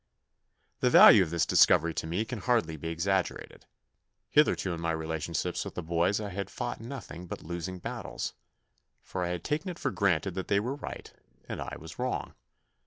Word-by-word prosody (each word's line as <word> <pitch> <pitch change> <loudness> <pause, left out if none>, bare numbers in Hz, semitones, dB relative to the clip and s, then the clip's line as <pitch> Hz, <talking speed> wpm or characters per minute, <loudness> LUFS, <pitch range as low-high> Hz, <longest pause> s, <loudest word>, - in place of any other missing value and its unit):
The 125 - +3
value 110 -3 +9
of 90 - +1
this 85 0 +1
discovery 85 +1 +5
to 80 - -3
me 90 +7 -1
can 115 0 -5
hardly 95 -8 +1
be 80 +2 -6
exaggerated. 90 +3 -2 0.6
Hitherto 145 - +3
in 85 - -5
my 85 - -1
relationships 80 +2 -2
with - - -8
the - - -4
boys 85 +5 +1
I 105 -1 -4
had 100 0 -4
fought 120 - -4
nothing 115 -8 -8
but - - -7
losing 85 +2 -5
battles, 90 - -5 0.7
for 95 - -5
I - - -1
had 90 -1 -3
taken 155 +6 -2
it 175 - -6
for - - -1
granted 95 -2 +1
that 95 +1 -4
they 100 - +3
were 120 +6 -2
right 145 - -8 0.3
and - - -5
I - - -5
was - - -11
wrong. - - -2
90 Hz, 185 wpm, -29 LUFS, 85-105 Hz, 0.7 s, value